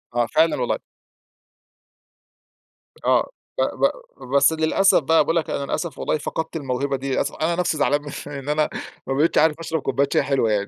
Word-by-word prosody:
آه، 120 0 +3
فعلًا 160 +7 +3
والله. - - 0 2.3
آه، - - +3 0.3
ب - - +1
ب - - +2 0.4
بس 140 +3 +5
للأسف 160 +5 +3
بقى، 160 +3 +4
باقول 165 - -1
لك 165 - 0
أنا - - -2
للأسف 160 +1 -3
والله - - 0
فقدت 160 +2 -4
الموهبة 140 -1 -1
دي، 135 +1 -4
للأس - - 0
أنا 170 +2 -1
نفسي 175 -3 0
زعلان 145 0 +2
من 145 0 -7
إن 140 0 -6
أنا 150 0 +1 0.4
ما 135 - 0
بقيتش 150 +5 +2
عارف 155 0 +3
أشرب 160 -2 -2
كوباية 140 +1 +1
شاي - - +3
حلوة 135 -6 +1
يعني، 100 -1 0
150 Hz, 180 wpm, -22 LUFS, 135-160 Hz, 2.3 s, بس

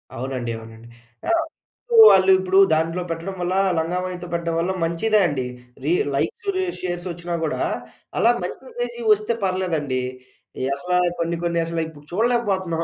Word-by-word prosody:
అవునండి, 125 -1 -3
అవునండి. 115 +1 -12 0.4
ఆహ్, 335 -1 +3 0.4
ఇప్పుడూ 475 -2 0
వాళ్ళు, 190 0 +5
ఇప్పుడు 190 0 +1 0.2
దాంట్లో 165 +3 0
పెట్టడం 165 +4 -4
వల్ల 175 +1 0 0.3
లంగాఓణితో 180 +2 -3
పెట్టడం 170 -1 -1
వల్ల 175 +3 0
మంచిదే 190 +7 +2
అండి. 135 -5 -2 0.4
రీ - - +2 0.2
లైక్సు, 415 -4 -2
రి 375 - +1 0.2
షేర్సొచ్చినా 175 -1 -4
గూడా, 155 - -1 0.6
అలా 230 - +5
మంచిగా 220 +8 -6
చేసి 240 0 -4
వస్తే 215 +2 +2
పర్లేదండి. 165 -9 0 0.6
ఈ - - -1
అసలా 180 +5 -1 0.2
కొన్ని 170 0 0
కొన్ని 170 0 0
అసల 165 0 -3
ఇప్పుడు 150 -2 -14
చూడలేకపోతున్నాం 195 -6 0
175 Hz, 145 wpm, -22 LUFS, 165-190 Hz, 0.6 s, వాళ్ళు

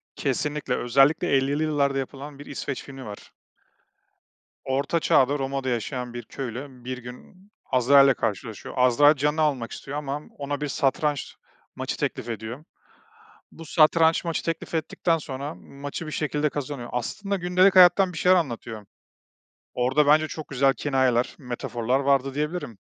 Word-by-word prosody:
Kesinlikle, 145 -1 -1
özellikle 135 +5 +3
50'li 140 +3 +1
yıllarda 140 -3 +1
yapılan 140 +1 -6
bir 145 - -10
İsveç 140 -1 -5
filmi 135 -2 -10
var. 105 -1 -10 1.3
Orta 140 +5 0
Çağ'da 140 -2 +3
Roma'da 135 -1 -2
yaşayan 125 +1 -3
bir 120 0 -6
köylü, 130 +1 -6 0.2
bir 130 0 -4
gün 125 - -13 0.2
Azrail'le 135 +2 +5
karşılaşıyor. 110 -2 -4
Azrail 130 +4 +5
canını 150 +3 0
almak 135 -6 0
istiyor 140 +2 -6
ama 145 0 -4 0.2
ona 145 0 -4
bir 150 - -1
satranç 140 +1 -1 0.4
maçı - - -4
teklif 120 - -3
ediyor. 115 +5 -6 0.9
Bu 165 - -11
satranç 160 +1 +4
maçı 165 -1 -2
teklif 165 0 -4
ettikten 165 +1 0
sonra 140 0 -6
maçı 145 +4 -8
bir - - -6
şekilde 150 0 -1
kazanıyor. 140 -4 -5
Aslında 195 - -3
gündelik 185 +1 +3
hayattan 180 0 +6
bir - - -7
şeyler 185 +2 +5
anlatıyor. 115 - -4 0.9
Orada, 135 +4 +2
bence, 155 +1 +5
çok 155 0 -7
güzel 135 0 +3
kinayeler, 130 -3 +1
metaforlar 125 -1 -2
vardı, 135 -1 +1
diyebilirim. 150 - -3
140 Hz, 140 wpm, -25 LUFS, 125-150 Hz, 1.3 s, hayattan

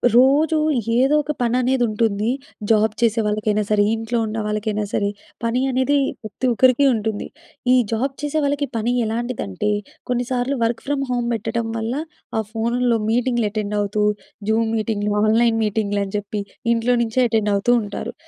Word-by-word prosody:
రోజూ 285 +5 +5 0.4
ఏదో 265 +4 +4
ఒక 295 - -2
పననేదుంటుంది. 235 -3 +1 0.4
జాబ్ 215 0 +3
చేసే 230 -1 +3
వాళ్ళకయినా 210 0 0
సరే, 210 -1 +4
ఇంట్లో 225 +1 -2
ఉన్నవాళ్ళకయినా 215 -1 -2
సరే, 200 - +1 0.3
పని 230 +2 +1
అనేదీ 260 +3 +2 0.2
ప్రతి 215 +4 -5
ఒక్కరికి 255 +3 +4
ఉంటుంది. 220 -2 -2 0.5
ఈ - - +6 0.2
జాబ్ 260 +5 0
చేసే 295 +1 -1
వాళ్ళకి 285 0 0
పని 225 +2 0
ఎలాంటిదంటే, 220 - -2 0.4
కొన్నిసార్లు 250 +2 -1
వర్క్ 230 0 -1
ఫ్రమ్ 285 -1 0
హోమ్ 245 -1 0
బెట్టటం 230 +1 -2
వల్ల, 225 +1 -2 0.4
ఆ - - +2
ఫోన్లో 235 +1 +1
మీటింగ్‌లెటెండవుతూ, 210 -4 0 0.5
జూమ్ 225 +1 +2
మీటింగ్లు, 210 -1 -1
ఆన్‍లైన్ 225 +1 +3
మీటింగ్లని 200 -2 -1
జెప్పి, 205 0 -4 0.3
ఇంట్లో 235 +2 +2
నించే 230 +3 0
ఎటెండవుతూ 210 0 +1
ఉంటారు. 205 -1 -5
225 Hz, 130 wpm, -21 LUFS, 215-245 Hz, 0.5 s, ఈ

